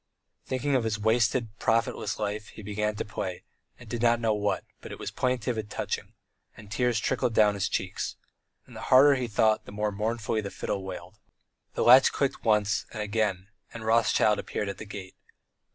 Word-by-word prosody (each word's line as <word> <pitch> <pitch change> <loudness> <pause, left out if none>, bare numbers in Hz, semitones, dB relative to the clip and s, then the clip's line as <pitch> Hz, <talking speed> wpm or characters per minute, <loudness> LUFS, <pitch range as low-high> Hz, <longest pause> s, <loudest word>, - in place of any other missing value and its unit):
Thinking 130 +2 -1
of 130 -3 +2
his 110 -1 -1
wasted, 110 +1 +1
profitless 115 -2 0
life, 105 0 -3
he 110 - -11
began 105 +1 -2
to - - -3
play, 95 -3 -5 0.3
he 125 - -14
did 115 +1 -4
not 120 0 +4
know 115 -2 +1
what, 105 -1 -1 0.2
but - - -10
it - - -7
was - - -5
plaintive 125 -2 -1
and 105 -1 -6
touching, - - -4 0.4
and 105 -1 -13
tears 120 -1 +1
trickled 120 0 0
down 105 -1 +5
his 100 -1 -1
cheeks. 95 -1 -3 0.5
And - - -15
the - - -7
harder 140 +3 +8
he 130 -3 -1
thought, 110 0 +2
the - - -10
more 105 +1 -1
mournfully 110 +1 -1
the 100 - -5
fiddle 100 0 -4
wailed. 90 +1 -8 0.6
The - - +1
latch 130 +3 +8
clicked 140 -2 -1
once 105 -2 +2
and 110 -2 -4
again, 105 -3 -1 0.3
and 115 -1 -7
Rothschild 110 -2 +3
appeared 105 - -3
at 100 - -6
the - - -7
gate. 100 -3 -8
110 Hz, 190 wpm, -27 LUFS, 105-115 Hz, 0.6 s, harder